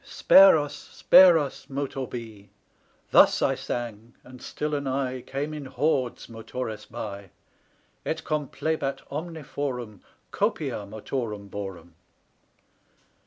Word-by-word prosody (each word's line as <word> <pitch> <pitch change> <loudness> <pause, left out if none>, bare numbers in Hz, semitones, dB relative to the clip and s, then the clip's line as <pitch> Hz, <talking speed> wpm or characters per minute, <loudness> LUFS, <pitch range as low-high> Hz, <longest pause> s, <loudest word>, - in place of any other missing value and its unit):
Spare 195 -3 +7
us, 145 -1 -3
spare 185 -3 +6
us, 145 -3 -4
Motor 135 -1 -3
Be! 110 -5 -9 0.6
Thus - - +6
I - - +3
sang; 120 -1 -6
and 125 0 -13
still 150 +3 -4
anigh 135 -2 -2
Came 145 +5 -4
in 150 -2 -6
hordes 130 -1 -1
Motores 115 0 -6
Bi, 100 -2 -7 0.7
Et - - -3
complebat 150 -1 -2
omne 160 +2 -5
forum 130 -7 -5 0.3
Copia 100 - -1
Motorum 105 -1 -5
Borum. 95 -4 -7
130 Hz, 110 wpm, -26 LUFS, 110-145 Hz, 0.7 s, Spare